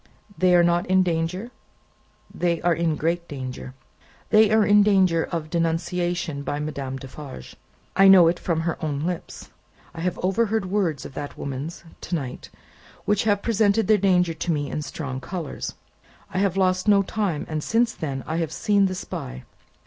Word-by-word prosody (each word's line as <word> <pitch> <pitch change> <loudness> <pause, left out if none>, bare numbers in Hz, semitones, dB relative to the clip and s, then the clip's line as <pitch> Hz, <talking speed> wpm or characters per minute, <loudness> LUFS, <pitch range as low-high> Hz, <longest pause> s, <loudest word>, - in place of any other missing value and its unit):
"They 185 -1 +4
are 175 - +6
not 170 0 +2
in 185 0 +4
danger?" 180 +6 -2 0.8
"They 170 -2 0
are 175 0 +3
in 165 -2 0
great 170 +2 -1
danger. 130 -2 -7 0.6
They 215 -1 +6
are 220 -1 +4
in 205 0 +6
danger 190 -5 +3
of 160 -2 -4
denunciation 170 -1 -1
by 145 +1 -3
Madame 140 -3 -4
Defarge. 135 - -10 0.4
I 195 0 +6
know 185 -3 +8
it 175 +1 +1
from 165 -2 -1
her 165 0 -3
own 145 -2 -2
lips. 175 -1 -5 0.4
I 165 - -9
have 180 +1 -1
overheard 215 +2 +1
words 180 -7 -1
of - - -9
that 145 +1 -6
woman's, 140 +6 -5 0.3
to 180 - 0
night, 135 -6 -5 0.6
which 210 +1 +1
have 205 -2 +2
presented 220 -1 +2
their 215 -1 +4
danger 180 -3 +3
to 165 +2 -2
me 145 -2 -2
in 150 - -2
strong 140 -3 -5
colours. 170 -4 -5 0.6
I 185 - 0
have 195 -1 +1
lost 185 0 +1
no 200 -1 +5
time, 195 -7 -2
and 155 -1 -3
since 230 +1 +1
then, 135 -4 -4
I 160 - -2
have 165 -3 -1
seen 200 +3 +2
the 185 - -3
spy. 65 - -6
175 Hz, 175 wpm, -24 LUFS, 155-195 Hz, 0.8 s, know